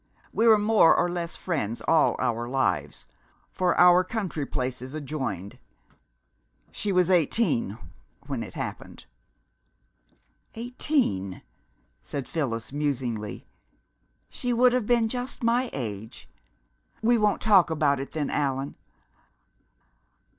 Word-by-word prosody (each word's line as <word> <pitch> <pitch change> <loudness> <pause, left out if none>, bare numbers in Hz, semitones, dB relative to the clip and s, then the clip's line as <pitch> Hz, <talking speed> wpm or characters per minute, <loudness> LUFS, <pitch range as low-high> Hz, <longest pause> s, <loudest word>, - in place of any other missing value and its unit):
We 230 - +2
were 220 -1 +8
more 210 -4 +5
or - - +2
less 175 -1 -4
friends 120 - -3
all 160 +4 +3
our 120 0 -1
lives, 90 - -1 0.5
for 180 -1 0
our 180 +1 +7
country 185 -8 -3
places 130 +2 -4
adjoined. 130 - -5 1.1
She 205 - -3
was 180 -1 +3
eighteen 160 - +2 0.5
when - - -3
it - - -8
happened." - - -7 1.5
"Eighteen," 230 - -1 0.6
said 140 -3 -5
Phyllis 115 -7 -3
musingly. 125 -8 -3 0.8
"She 245 - -3
would 245 +1 +4
have 250 -4 0
been 235 -2 +3
just 250 +2 -4
my 240 +2 +2
age.... 110 -3 -6 0.8
We 235 +1 +4
won't 210 -1 +2
talk 195 -6 +5
about 150 -3 +1
it, 135 - -6
then, 150 -3 -2
Allan 135 -1 -2
155 Hz, 110 wpm, -26 LUFS, -, 1.5 s, were